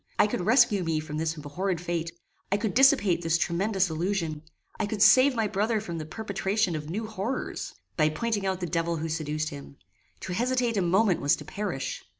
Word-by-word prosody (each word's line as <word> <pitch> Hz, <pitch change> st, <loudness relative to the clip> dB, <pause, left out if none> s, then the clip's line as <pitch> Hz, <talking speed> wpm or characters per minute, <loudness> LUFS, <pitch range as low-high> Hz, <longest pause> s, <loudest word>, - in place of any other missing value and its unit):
I -, -, +5 dB
could 210 Hz, -, -2 dB
rescue 210 Hz, -1 st, +4 dB
me 165 Hz, -2 st, 0 dB
from 155 Hz, 0 st, -5 dB
this 160 Hz, 0 st, -2 dB
abhorred 170 Hz, +5 st, -3 dB
fate; 170 Hz, -1 st, -2 dB, 0.4 s
I 200 Hz, -, +3 dB
could 210 Hz, 0 st, -2 dB
dissipate 255 Hz, -9 st, +4 dB
this 165 Hz, -1 st, +2 dB
tremendous 190 Hz, +3 st, +1 dB
illusion; 165 Hz, -2 st, -2 dB, 0.4 s
I 215 Hz, -, 0 dB
could 210 Hz, 0 st, -4 dB
save 255 Hz, +5 st, +6 dB
my 225 Hz, -2 st, +1 dB
brother 215 Hz, +3 st, 0 dB
from 170 Hz, -5 st, -5 dB
the 155 Hz, -, -6 dB
perpetration 200 Hz, -1 st, -1 dB
of 150 Hz, 0 st, -5 dB
new 215 Hz, +6 st, -3 dB
horrors, 215 Hz, +4 st, -4 dB, 0.2 s
by 155 Hz, -2 st, +4 dB
pointing 215 Hz, +5 st, -2 dB
out 190 Hz, -1 st, -1 dB
the -, -, -1 dB
devil 165 Hz, 0 st, -1 dB
who 160 Hz, +1 st, -3 dB
seduced 155 Hz, -1 st, -2 dB
him; 140 Hz, -1 st, -10 dB, 0.4 s
to 185 Hz, -, -4 dB
hesitate 245 Hz, +2 st, 0 dB
a 200 Hz, -, +2 dB
moment 185 Hz, +2 st, +2 dB
was 145 Hz, -, +3 dB
to 150 Hz, -, -11 dB
perish. 175 Hz, -6 st, -4 dB
185 Hz, 195 wpm, -27 LUFS, 160-215 Hz, 0.4 s, save